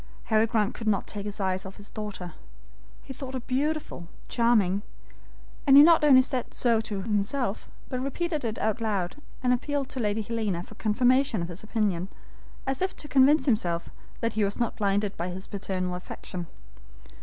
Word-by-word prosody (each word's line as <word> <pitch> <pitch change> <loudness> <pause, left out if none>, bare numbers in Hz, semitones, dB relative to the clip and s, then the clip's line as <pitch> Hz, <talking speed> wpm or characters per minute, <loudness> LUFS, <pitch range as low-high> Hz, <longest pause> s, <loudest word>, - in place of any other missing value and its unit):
Harry 220 0 +3
Grant 215 -1 +1
could 225 - -6
not 200 -3 +2
take 205 -1 -6
his 205 - -6
eyes 190 -1 0
off 190 0 -9
his 205 - -12
daughter. 205 -5 -6 0.7
He 265 - -8
thought 265 0 -7
her - - -1
beautiful, 270 - -2 0.2
charming; 215 -5 +3 0.9
and 275 0 +8
he 285 - +11
not 330 -1 +6
only 265 -3 +7
said 255 -2 -3
so 230 -3 +3
to 205 -3 -4
himself, 210 +2 -1 0.2
but 255 - -3
repeated 300 +3 -2
it 225 -1 -2
aloud, 215 -3 -1 0.3
and 250 0 +4
appealed 280 +2 -1
to 260 - -5
Lady 215 -1 0
Helena 210 -6 -2
for 220 - -13
confirmation 245 0 +2
of 170 - -5
his 175 +1 -6
opinion, 210 -5 -1 0.6
as 270 +3 -2
if 375 0 0
to 295 - -6
convince 285 +2 +5
himself 180 - 0 0.3
that 230 -1 0
he 215 - +1
was 200 +3 -1
not 235 - 0
blinded 205 -1 0
by 170 - -2
his 185 +2 -6
paternal 185 -2 -3
affection. 180 -1 -7
220 Hz, 180 wpm, -27 LUFS, 195-255 Hz, 0.9 s, he